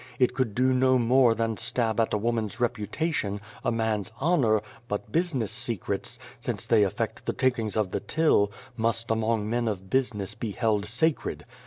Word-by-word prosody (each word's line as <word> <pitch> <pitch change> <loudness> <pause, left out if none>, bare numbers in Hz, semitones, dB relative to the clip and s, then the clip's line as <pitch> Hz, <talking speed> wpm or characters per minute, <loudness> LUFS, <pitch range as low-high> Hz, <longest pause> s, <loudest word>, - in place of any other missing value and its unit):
It 125 -1 +3
could 125 -5 -1
do 130 +1 +3
no 130 0 +4
more 120 0 +4
than 115 -1 -1
stab 115 -1 +1
at 115 - +2
a - - +2
woman's 115 0 -1
reputation, 115 - -1 0.2
a - - +1
man's 110 -2 -1
honour, 130 -10 +3 0.2
but 105 0 -4
business 145 - 0
secrets 115 -2 -1 0.2
since 120 -4 -3
they 115 -2 +4
affect 100 -3 -1
the - - +1
takings 115 -5 0
of 105 -4 0
the - - -1
till 150 -11 +2 0.2
must 115 0 0
among 110 -1 0
men 120 +1 0
of 95 -3 -4
business 110 -7 +1
be 105 -1 -5
held 105 -3 0
sacred. 140 +8 0
115 Hz, 170 wpm, -27 LUFS, 105-125 Hz, 0.2 s, no